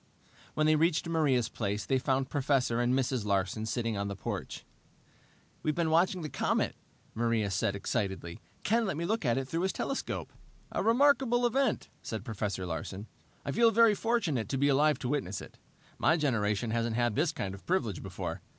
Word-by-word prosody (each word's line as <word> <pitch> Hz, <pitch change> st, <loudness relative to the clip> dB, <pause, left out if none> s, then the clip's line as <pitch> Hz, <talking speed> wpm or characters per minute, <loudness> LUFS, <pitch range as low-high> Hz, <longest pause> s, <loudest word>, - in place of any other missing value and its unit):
When 155 Hz, -, +2 dB
they 155 Hz, 0 st, +5 dB
reached 165 Hz, +2 st, +2 dB
Maria's 145 Hz, -8 st, +2 dB
place 105 Hz, -2 st, -3 dB
they 135 Hz, -, +2 dB
found 130 Hz, +1 st, 0 dB
Professor 130 Hz, -4 st, +1 dB
and 120 Hz, 0 st, +2 dB
Mrs. 130 Hz, -2 st, +1 dB
Larsen 100 Hz, +2 st, 0 dB
sitting 115 Hz, -1 st, -1 dB
on 100 Hz, 0 st, -2 dB
the 100 Hz, -, -4 dB
porch. -, -, -5 dB, 1.0 s
"We've 155 Hz, -1 st, 0 dB
been 165 Hz, -2 st, +1 dB
watching 180 Hz, +2 st, +3 dB
the -, -, -2 dB
comet," -, -, 0 dB, 0.4 s
Maria 115 Hz, -3 st, 0 dB
said 100 Hz, +2 st, 0 dB
excitedly. 95 Hz, -4 st, -3 dB, 0.2 s
"Ken 225 Hz, +1 st, +2 dB
let 190 Hz, -, -2 dB
me 170 Hz, -, -2 dB
look 220 Hz, -2 st, -1 dB
at 120 Hz, -1 st, +2 dB
it 135 Hz, -1 st, -2 dB
through 165 Hz, +5 st, -2 dB
his 190 Hz, +1 st, +1 dB
telescope." 275 Hz, -, -3 dB, 0.4 s
"A -, -, -1 dB
remarkable 245 Hz, 0 st, +4 dB
event," 255 Hz, 0 st, +1 dB
said 110 Hz, -1 st, -5 dB
Professor 105 Hz, -5 st, -3 dB
Larsen. 90 Hz, +4 st, -5 dB, 0.4 s
"I 140 Hz, -, -1 dB
feel 230 Hz, +9 st, +5 dB
very 230 Hz, -1 st, +5 dB
fortunate 200 Hz, -, 0 dB
to 135 Hz, -, -1 dB
be 140 Hz, +2 st, +3 dB
alive 150 Hz, +2 st, +4 dB
to 125 Hz, -, -4 dB
witness 100 Hz, -9 st, -1 dB
it. -, -, -12 dB, 0.4 s
My 160 Hz, -, +4 dB
generation 115 Hz, -6 st, 0 dB
hasn't 115 Hz, 0 st, 0 dB
had 120 Hz, -1 st, +1 dB
this 155 Hz, +2 st, +2 dB
kind 95 Hz, -1 st, -4 dB
of 95 Hz, -, -12 dB
privilege 120 Hz, -, 0 dB
before. -, -, -5 dB
130 Hz, 185 wpm, -30 LUFS, 110-165 Hz, 1.0 s, they